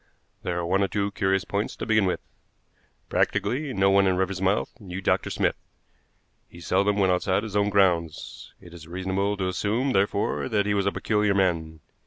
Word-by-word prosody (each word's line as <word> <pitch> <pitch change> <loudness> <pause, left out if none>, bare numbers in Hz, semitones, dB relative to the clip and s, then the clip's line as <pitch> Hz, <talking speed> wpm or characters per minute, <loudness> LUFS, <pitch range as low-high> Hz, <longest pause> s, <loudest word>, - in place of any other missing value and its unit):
There 90 -1 -3
are 85 - -2
one 95 +3 +1
or 100 - +2
two 100 0 -1
curious 95 0 0
points 100 +2 -2
to - - -5
begin 110 -2 +3
with. 90 - -1 0.9
Practically 140 +3 0
no 95 -4 +3
one 100 0 +4
in 95 -1 +2
Riversmouth 95 +1 0
knew 95 -3 -7
Dr. 95 - 0
Smith. - - 0 0.9
He 85 - -13
seldom 100 +4 +1
went 95 -2 +3
outside 95 +2 0
his 110 -3 -6
own 100 0 +2
grounds. 90 -5 0
It 85 - -14
is 80 -2 -11
reasonable 95 +3 -2
to 95 -1 -1
assume, 110 +8 0
therefore, 100 +5 0
that 105 -3 +1
he 105 - +1
was 100 -1 +1
a - - +2
peculiar 105 -2 +1
man. 80 -5 0
95 Hz, 185 wpm, -25 LUFS, 90-100 Hz, 0.9 s, one